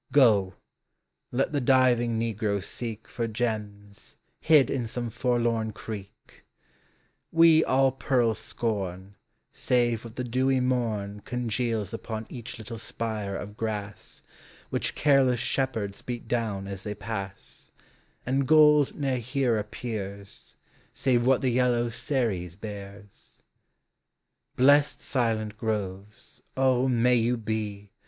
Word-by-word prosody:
Go, 105 Hz, -9 st, +4 dB, 0.8 s
let 135 Hz, +3 st, 0 dB
the 145 Hz, -2 st, 0 dB
diving 120 Hz, -3 st, +3 dB
negro 110 Hz, -3 st, -1 dB
seek 115 Hz, 0 st, -6 dB
For 115 Hz, -1 st, -3 dB
gems, 105 Hz, -3 st, -5 dB, 0.2 s
hid 155 Hz, -4 st, +5 dB
in 120 Hz, -4 st, -1 dB
some 120 Hz, 0 st, -4 dB
forlorn 115 Hz, -2 st, 0 dB
creek: 100 Hz, -2 st, -10 dB, 0.9 s
We 165 Hz, -1 st, +6 dB
all 135 Hz, 0 st, +3 dB
pearls 125 Hz, -3 st, +1 dB
scorn 100 Hz, -4 st, -3 dB, 0.4 s
Save 120 Hz, -2 st, +1 dB
what 115 Hz, -1 st, -10 dB
the 125 Hz, -, -3 dB
dewy 130 Hz, +2 st, +1 dB
morn 110 Hz, -5 st, -1 dB
Congeals 115 Hz, -3 st, -2 dB
upon 110 Hz, -1 st, -5 dB
each 120 Hz, -1 st, -7 dB
little 115 Hz, +1 st, -8 dB
spire 110 Hz, -3 st, -4 dB
of 105 Hz, +1 st, -6 dB
grass, 105 Hz, -2 st, -5 dB, 0.5 s
Which -, -, -1 dB
careless 135 Hz, -4 st, +3 dB
shepherds 115 Hz, -6 st, -1 dB
beat 120 Hz, -2 st, -6 dB
down 110 Hz, -5 st, -1 dB
as 100 Hz, -1 st, -6 dB
they 105 Hz, +1 st, -5 dB
pass; 100 Hz, -2 st, -7 dB, 0.6 s
And 135 Hz, +1 st, 0 dB
gold 150 Hz, -2 st, +6 dB
ne'er 135 Hz, -3 st, -1 dB
here 125 Hz, -1 st, 0 dB
appears, 100 Hz, -2 st, -7 dB, 0.4 s
Save 125 Hz, -2 st, +1 dB
what 135 Hz, -1 st, +4 dB
the 130 Hz, -, +1 dB
yellow 120 Hz, -1 st, +2 dB
Ceres 110 Hz, -, -2 dB
bears. 100 Hz, -1 st, -9 dB, 1.2 s
Blest 145 Hz, +3 st, +4 dB
silent 110 Hz, -4 st, -1 dB
groves, 105 Hz, +1 st, -5 dB, 0.2 s
O, 130 Hz, -1 st, +3 dB
may 125 Hz, 0 st, +3 dB
you 120 Hz, +2 st, +1 dB
be. 105 Hz, -2 st, -4 dB
115 Hz, 120 wpm, -27 LUFS, 105-125 Hz, 1.2 s, We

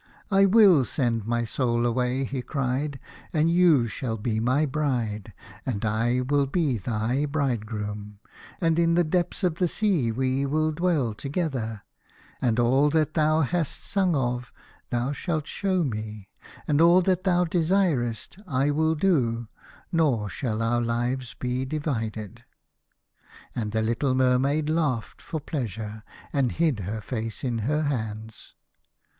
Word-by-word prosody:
" -, -, -29 dB
I 195 Hz, 0 st, +5 dB
will 195 Hz, -, +6 dB
send 115 Hz, -4 st, -1 dB
my 120 Hz, 0 st, 0 dB
soul 120 Hz, 0 st, 0 dB
away," 125 Hz, +2 st, 0 dB
he 130 Hz, 0 st, -3 dB
cried, 135 Hz, +1 st, -2 dB, 0.3 s
"and 160 Hz, +1 st, +2 dB
you 170 Hz, -8 st, +5 dB
shall 115 Hz, +1 st, -3 dB
be 110 Hz, 0 st, -1 dB
my 130 Hz, +7 st, +2 dB
bride, 125 Hz, -8 st, -2 dB, 0.3 s
and 115 Hz, -4 st, -2 dB
I 115 Hz, +4 st, +1 dB
will 140 Hz, +2 st, +1 dB
be 140 Hz, -, 0 dB
thy 115 Hz, +7 st, -1 dB
bridegroom, 105 Hz, -7 st, -3 dB, 0.4 s
and 165 Hz, -2 st, +2 dB
in 170 Hz, 0 st, +3 dB
the 175 Hz, -, +4 dB
depth 175 Hz, +4 st, -1 dB
of 175 Hz, -3 st, +1 dB
the 180 Hz, -, +3 dB
sea 170 Hz, -, +1 dB
we 130 Hz, +3 st, 0 dB
will 155 Hz, +3 st, +1 dB
dwell 155 Hz, -8 st, 0 dB
together, 130 Hz, -, -3 dB, 0.6 s
and 115 Hz, -2 st, +1 dB
all 130 Hz, +5 st, +4 dB
that 155 Hz, 0 st, +1 dB
thou 155 Hz, 0 st, +3 dB
hast 160 Hz, +1 st, -1 dB
sung 190 Hz, -4 st, +1 dB
of 125 Hz, -2 st, -1 dB, 0.4 s
thou 120 Hz, +3 st, -1 dB
shalt 155 Hz, 0 st, -2 dB
show 185 Hz, +1 st, 0 dB
me, 110 Hz, -6 st, -5 dB, 0.4 s
and 150 Hz, +1 st, +3 dB
all 175 Hz, +2 st, +6 dB
that 185 Hz, 0 st, +1 dB
thou 180 Hz, -2 st, +3 dB
desirest 165 Hz, -, 0 dB
I 140 Hz, -1 st, +1 dB
will 160 Hz, +2 st, +2 dB
do, 120 Hz, -, +1 dB, 0.4 s
norshall 115 Hz, -6 st, 0 dB
our 120 Hz, +1 st, +1 dB
lives 120 Hz, +2 st, -2 dB
be 125 Hz, +1 st, -2 dB
divided." 115 Hz, -, -4 dB, 1.1 s
And 110 Hz, -3 st, -3 dB
the 110 Hz, 0 st, 0 dB
little 130 Hz, +4 st, 0 dB
Mermaid 130 Hz, +4 st, +2 dB
laughed 155 Hz, -8 st, -1 dB
forpleasure, 115 Hz, -, -5 dB, 0.3 s
and 135 Hz, -4 st, +1 dB
hid 155 Hz, -8 st, +1 dB
her 105 Hz, +3 st, -4 dB
face 115 Hz, -2 st, -4 dB
in 120 Hz, -3 st, -1 dB
her 150 Hz, +8 st, 0 dB
hands. 110 Hz, -5 st, -4 dB
130 Hz, 140 wpm, -26 LUFS, 115-155 Hz, 1.1 s, will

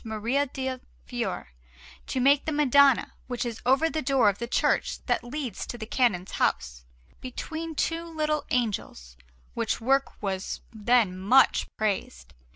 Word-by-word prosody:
Maria 230 Hz, +6 st, -1 dB
del 260 Hz, -1 st, -4 dB, 0.3 s
Fiore -, -, -4 dB, 0.6 s
to 260 Hz, -, -2 dB
make 275 Hz, +2 st, +4 dB
the 315 Hz, -, -1 dB
Madonna 280 Hz, -2 st, +4 dB
which 245 Hz, -1 st, -3 dB
is 235 Hz, -2 st, -5 dB
over 270 Hz, +5 st, +4 dB
that 315 Hz, -1 st, -3 dB
door 265 Hz, -6 st, +4 dB
of 200 Hz, -, -3 dB
the 235 Hz, -, -3 dB
church -, -, 0 dB
that -, -, 0 dB
leads 245 Hz, -4 st, -5 dB
to 240 Hz, -, -6 dB
the 220 Hz, -, -6 dB
Canon's 215 Hz, -7 st, 0 dB
house, 60 Hz, -1 st, -1 dB, 0.4 s
between 315 Hz, +5 st, -6 dB
two 330 Hz, +3 st, -1 dB
little 305 Hz, -2 st, -1 dB
angels; 200 Hz, -, -2 dB, 0.4 s
which -, -, -1 dB
work 270 Hz, +4 st, +1 dB
was 190 Hz, -1 st, -3 dB
then 220 Hz, -3 st, +2 dB
much 205 Hz, +9 st, +4 dB
praised. 185 Hz, -, -3 dB
250 Hz, 150 wpm, -27 LUFS, 205-280 Hz, 0.6 s, make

